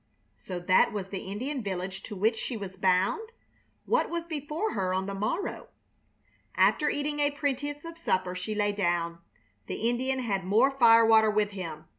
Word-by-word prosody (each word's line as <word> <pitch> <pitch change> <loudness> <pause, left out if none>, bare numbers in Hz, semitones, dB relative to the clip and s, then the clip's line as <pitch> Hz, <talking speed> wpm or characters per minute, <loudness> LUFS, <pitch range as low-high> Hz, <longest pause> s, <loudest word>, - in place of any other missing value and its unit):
So 180 -2 -6
that 185 +1 +4
was 195 -3 -4
the 195 - -4
Indian 260 +7 -3
village 190 -2 -4
to 210 - -6
which 220 +4 +2
she 235 +1 -4
was 195 -2 -7
bound? 190 - +1 0.5
What 485 - +1
was 340 -1 -3
before 315 +6 -3
her 185 -2 -1
on 190 0 -1
the 200 - -4
morrow? 215 - -3 0.9
After 300 - +3
eating 295 +1 -2
a 290 0 +3
pretense 290 +1 -3
of 330 0 -9
supper 185 - 0
she 185 +4 -4
lay 205 0 +1
down. 175 -4 -1 0.5
The 225 - -2
Indian 260 +2 0
had 210 -7 -1
more 220 +9 +3
firewater 225 -4 +6
with 210 -1 +1
him. 165 -5 -7
215 Hz, 170 wpm, -28 LUFS, 190-285 Hz, 0.9 s, firewater